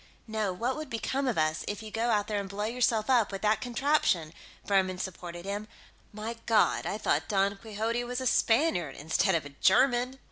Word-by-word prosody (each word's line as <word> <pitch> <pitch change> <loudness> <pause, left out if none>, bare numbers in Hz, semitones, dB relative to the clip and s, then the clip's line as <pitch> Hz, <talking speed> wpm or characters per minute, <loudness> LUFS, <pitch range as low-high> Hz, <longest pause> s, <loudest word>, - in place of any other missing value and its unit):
"No, 215 -3 -1
what 235 +8 -2
would 310 -2 -6
become 265 +4 -2
of 245 - 0
us, 155 0 +1
if 205 +2 -4
you 215 - -8
go 230 +2 0
out 205 -3 +2
there 210 -1 -2
and 195 -1 -5
blow 205 +2 -3
yourself 230 -2 +1
up 240 -6 +3
with 195 +1 -6
that 215 0 +2
contraption?" 235 - +1 0.3
Buhrmann 190 -2 +2
supported 175 -1 -6
him. 205 +2 -4 0.4
"My 220 +2 -5
God, 225 -2 +3
I 205 - -2
thought - - 0
Don 200 -1 +2
Quixote 225 +3 -2
was 245 +1 -3
a 260 - -4
Spaniard, 225 - +2
instead 160 +5 +1
of 155 -4 -1
a - - -7
German!" 245 - +2
215 Hz, 200 wpm, -29 LUFS, 195-240 Hz, 0.4 s, up